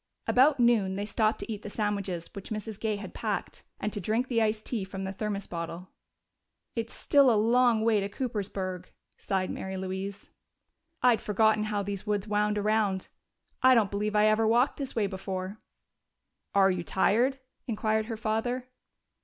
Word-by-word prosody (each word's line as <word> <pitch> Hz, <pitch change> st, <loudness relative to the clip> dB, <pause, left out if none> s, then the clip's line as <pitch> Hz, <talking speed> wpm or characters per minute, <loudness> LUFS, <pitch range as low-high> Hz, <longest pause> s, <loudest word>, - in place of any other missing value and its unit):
About 270 Hz, +2 st, +4 dB
noon 225 Hz, -6 st, +3 dB
they 200 Hz, +1 st, -2 dB
stopped 215 Hz, +1 st, +1 dB
to -, -, -5 dB
eat 210 Hz, -, -7 dB
the 210 Hz, -, -7 dB
sandwiches 200 Hz, -5 st, -2 dB
which 200 Hz, -3 st, -8 dB
Mrs. 215 Hz, -1 st, -5 dB
Gay 220 Hz, -1 st, 0 dB
had 200 Hz, -2 st, -8 dB
packed 215 Hz, -3 st, -3 dB, 0.2 s
and 210 Hz, -, -2 dB
to 205 Hz, -, -3 dB
drink 225 Hz, +7 st, 0 dB
the 230 Hz, -3 st, +2 dB
iced 215 Hz, 0 st, 0 dB
tea 225 Hz, -6 st, -2 dB
from 190 Hz, 0 st, -6 dB
the 190 Hz, 0 st, -4 dB
thermos 205 Hz, 0 st, -3 dB
bottle. 170 Hz, +1 st, -6 dB, 0.9 s
"It's 230 Hz, -1 st, -3 dB
still 280 Hz, -2 st, +4 dB
a 225 Hz, -, +4 dB
long 230 Hz, 0 st, +3 dB
walk 220 Hz, -2 st, +4 dB
to 200 Hz, 0 st, -2 dB
Coopersburg," 195 Hz, -5 st, -4 dB, 0.3 s
sighed 190 Hz, -1 st, -1 dB
Mary 190 Hz, 0 st, -5 dB
Louise. 190 Hz, +1 st, -5 dB, 0.7 s
"I'd 245 Hz, -3 st, +5 dB
forgotten 215 Hz, +1 st, +2 dB
how 210 Hz, -1 st, -1 dB
these 200 Hz, +1 st, -5 dB
woods 205 Hz, 0 st, 0 dB
wound 210 Hz, 0 st, +1 dB
around. 205 Hz, -2 st, +1 dB, 0.5 s
I 260 Hz, 0 st, +7 dB
don't 215 Hz, -4 st, +3 dB
believe 210 Hz, +1 st, -1 dB
I 210 Hz, 0 st, +5 dB
ever 215 Hz, +1 st, +3 dB
walked 240 Hz, +4 st, +3 dB
this 275 Hz, -2 st, -5 dB
way 220 Hz, -3 st, +2 dB
before." 190 Hz, +1 st, -4 dB, 1.0 s
"Are 195 Hz, -1 st, +6 dB
you 180 Hz, -2 st, -2 dB
tired?" 235 Hz, +9 st, +2 dB, 0.3 s
inquired 220 Hz, -1 st, 0 dB
her 225 Hz, -2 st, -4 dB
father. 230 Hz, +4 st, -1 dB
210 Hz, 170 wpm, -29 LUFS, 195-225 Hz, 1.0 s, I